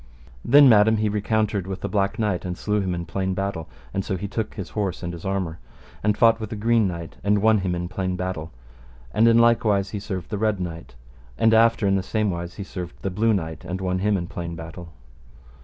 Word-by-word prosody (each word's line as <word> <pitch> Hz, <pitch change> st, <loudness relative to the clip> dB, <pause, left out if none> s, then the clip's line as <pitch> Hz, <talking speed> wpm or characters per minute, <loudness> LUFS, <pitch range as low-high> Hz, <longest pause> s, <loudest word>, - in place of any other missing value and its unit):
Then, 140 Hz, +3 st, +7 dB
madam, 110 Hz, -1 st, +6 dB
he 105 Hz, -1 st, 0 dB
recountered 105 Hz, -2 st, 0 dB
with 95 Hz, -1 st, -5 dB
the -, -, -2 dB
Black 100 Hz, -2 st, 0 dB
Knight, 105 Hz, -5 st, 0 dB
and 90 Hz, -1 st, -4 dB
slew 105 Hz, -1 st, 0 dB
him 90 Hz, -2 st, -1 dB
in 85 Hz, 0 st, -4 dB
plain 95 Hz, +3 st, -2 dB
battle, 95 Hz, -5 st, -3 dB, 0.2 s
and 95 Hz, -, -1 dB
so 95 Hz, -, -2 dB
he 100 Hz, -, -4 dB
took 110 Hz, +2 st, -4 dB
his 95 Hz, -4 st, -6 dB
horse 100 Hz, -5 st, -2 dB
and 85 Hz, 0 st, -4 dB
his 85 Hz, +1 st, -9 dB
armour 95 Hz, -4 st, -2 dB, 0.4 s
and 105 Hz, 0 st, +1 dB
fought 115 Hz, -1 st, +5 dB
with 110 Hz, -2 st, -5 dB
the 110 Hz, -, -5 dB
Green 115 Hz, 0 st, +2 dB
Knight 85 Hz, -2 st, -6 dB
and 105 Hz, 0 st, +3 dB
won 110 Hz, +1 st, +4 dB
him 90 Hz, -2 st, -1 dB
in 90 Hz, 0 st, -3 dB
plain 90 Hz, 0 st, -2 dB
battle, 90 Hz, -3 st, -4 dB, 0.6 s
and 115 Hz, +2 st, +4 dB
in 115 Hz, 0 st, +6 dB
like 115 Hz, 0 st, +4 dB
wise 100 Hz, -3 st, +1 dB
he 105 Hz, -, -3 dB
served 95 Hz, -2 st, -6 dB
the 105 Hz, -, -2 dB
Red 110 Hz, -2 st, +1 dB
Knight, 85 Hz, -7 st, -6 dB, 0.4 s
and 110 Hz, 0 st, +4 dB
after 115 Hz, -1 st, +4 dB
in 95 Hz, 0 st, +3 dB
the -, -, 0 dB
same 105 Hz, +1 st, -1 dB
wise 85 Hz, 0 st, -5 dB
he 100 Hz, -, -5 dB
served 90 Hz, -2 st, -7 dB
the 95 Hz, -, -1 dB
Blue 110 Hz, +5 st, +2 dB
Knight 80 Hz, -6 st, -2 dB
and 90 Hz, +1 st, -4 dB
won 90 Hz, -1 st, -1 dB
him 105 Hz, +1 st, +2 dB
in 85 Hz, -, -3 dB
plain 85 Hz, -1 st, -6 dB
battle. 80 Hz, +1 st, -9 dB
95 Hz, 235 wpm, -24 LUFS, 90-110 Hz, 0.6 s, Then